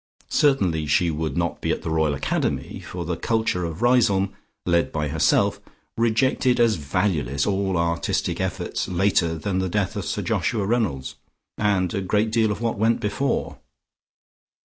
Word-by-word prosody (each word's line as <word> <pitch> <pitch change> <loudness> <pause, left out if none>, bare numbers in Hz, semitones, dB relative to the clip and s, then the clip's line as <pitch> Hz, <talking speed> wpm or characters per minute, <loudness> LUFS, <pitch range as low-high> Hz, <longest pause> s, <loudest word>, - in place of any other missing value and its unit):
Certainly 95 - +2
she 85 +4 +2
would 80 -1 -3
not 85 -1 -1
be - - -2
at - - -1
the - - -3
Royal 80 -2 +1
Academy, 70 - -2
for 90 -1 -6
the 85 +1 -2
culture 110 -2 0
of 85 +6 -5
Riseholme, 115 -6 +3 0.3
led 85 -1 +2
by 75 -1 -2
herself, 80 +1 +2 0.3
rejected 120 +2 +2
as 115 -2 +4
valueless 75 -4 0
all 95 -2 0
artistic 85 0 -1
efforts - - -2
later 90 -2 +1
than 95 +4 -2
the 95 0 -1
death 100 0 -1
of - - -3
Sir - - -2
Joshua 105 -4 0
Reynolds, 100 - -1 0.4
and 100 -4 +1
a 100 - -1
great 105 +3 +1
deal 110 -1 +2
of 105 +1 -4
what 115 -3 -1
went 115 +2 +2
before. 135 +6 -2
95 Hz, 160 wpm, -23 LUFS, 80-110 Hz, 0.4 s, as